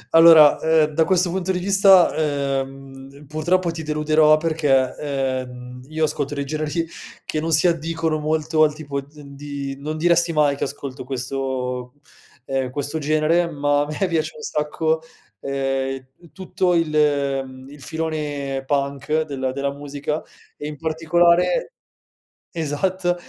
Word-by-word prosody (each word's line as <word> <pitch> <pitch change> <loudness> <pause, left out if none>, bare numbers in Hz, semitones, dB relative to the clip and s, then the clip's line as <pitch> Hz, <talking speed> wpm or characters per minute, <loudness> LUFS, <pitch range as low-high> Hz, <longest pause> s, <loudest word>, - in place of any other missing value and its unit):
Allora, 165 -3 +8
ehm, 160 -1 +3
da 160 +1 +3
questo 180 -2 +2
punto 190 +1 -1
di 180 - -1
vista, 195 -1 +5
ehm, 135 -1 -4
purtroppo 170 +4 0
ti 165 -1 -6
deluderò 155 0 +3
perché, 150 -5 +1
ehm, 130 -3 -4
io 155 +1 -2
ascolto 145 -1 -1
dei 140 0 -3
generi 155 +3 -2 0.4
che 155 - -2
non 165 +2 -2
si 160 +3 +4
addicono 165 -1 -1
molto 155 +1 0
al 150 -1 +4
tipo 145 -2 -4
di 135 - -18 0.2
d - - -13
n - - -12
di 140 -1 -6
non 155 +2 -4
diresti 170 +1 +3
mai 150 -2 +3
che - - -2
ascolto 140 -2 -7
questo 125 -1 -4 0.5
ehm, 135 -1 -2
questo 145 +4 -3
genere, 155 +3 +2
ma 145 -1 +1
a - - 0
me 155 +6 -1
piace 165 -3 -1
un 460 - -11
sacco, 160 - -1 0.4
ehm, 135 0 -2 0.3
tutto 185 -1 -1
il 165 -2 +1 0.6
mhmm, 130 0 -12
il 145 0 -13
filone 145 -3 -3
Punk 140 +2 0
della 135 -4 -3
della 140 +1 -2
musica, 145 +2 -4 0.4
e 145 - -6
in 150 -1 -7
particolare 170 - +2 0.8
esat 175 +3 -1
150 Hz, 145 wpm, -21 LUFS, 140-160 Hz, 0.8 s, Allora